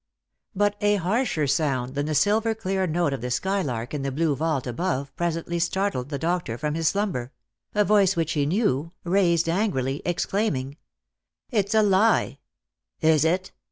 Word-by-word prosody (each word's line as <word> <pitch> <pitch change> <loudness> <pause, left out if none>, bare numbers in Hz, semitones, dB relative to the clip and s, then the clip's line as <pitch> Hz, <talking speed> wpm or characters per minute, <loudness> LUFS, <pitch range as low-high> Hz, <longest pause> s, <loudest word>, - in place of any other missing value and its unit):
But 205 +1 +1
a 205 0 +3
harsher 195 - 0
sound 135 -3 0
than 145 +1 -2
the 155 - -1
silver 220 +5 +2
clear 190 -3 -1
note 165 -3 0
of 135 - -4
the 125 - -3
skylark 125 - -2
in 145 - -2
the 135 0 -2
blue 150 +1 +1
vault 155 -3 -1
above 140 +1 -2
presently 170 0 -2
startled 175 -6 -1
the 145 - -3
doctor 165 -7 -2
from 150 +4 -2
his 165 0 0
slumber 175 - -1 0.2
— 115 - -41
a 210 0 +3
voice 200 -2 +4
which 165 -1 0
he 145 -2 0
knew, 165 - 0
raised 170 -2 +2
angrily, 165 - 0
exclaiming, 170 -6 -1 0.4
— - - -62 0.3
"It's 210 -2 0
a 215 - +5
lie!" 205 +2 +3 0.3
" - - -61
Is 155 -2 +4
it 180 +3 0
165 Hz, 175 wpm, -25 LUFS, 140-195 Hz, 0.4 s, a